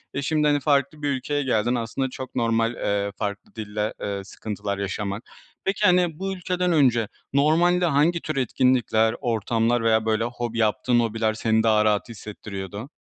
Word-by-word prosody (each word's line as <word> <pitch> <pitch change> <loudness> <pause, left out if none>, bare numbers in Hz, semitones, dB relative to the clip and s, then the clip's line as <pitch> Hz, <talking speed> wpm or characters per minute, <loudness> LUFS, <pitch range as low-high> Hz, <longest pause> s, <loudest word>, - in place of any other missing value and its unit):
ve 140 - -1
şimdi, 150 +1 +1
hani, 145 -1 +3
farklı 140 +1 +1
bir 145 - 0
ülkeye 145 +2 -1
geldin. 120 -1 +1
Aslında 125 +3 -2
çok 130 0 -8
normal, 115 0 +1
eee, 100 -2 -1
farklı 100 +3 -5
dille, 105 0 -3
eee, 100 -1 -3
sıkıntılar 100 0 -5
yaşaman. 100 +1 -3 0.4
Peki, 200 +2 0
hani, 175 -4 +3
bu 195 0 -2
ülkeden 180 -1 -1
önce 125 -8 +3 0.3
normalde 170 +5 +3
hangi 165 +3 +2
tür 155 - -4
etkinlikler, 120 -3 +2
ortamlar 115 0 +1
veya, 110 -1 +3
böyle, 110 0 +1
hobi 120 -1 -4
yaptığın 115 +2 +2
hobiler 110 -1 0
seni 110 0 +1
daha 110 -1 +3
rahat 105 +2 +1
hissettiriyordu? 105 +1 -7
120 Hz, 160 wpm, -24 LUFS, 110-145 Hz, 0.4 s, hani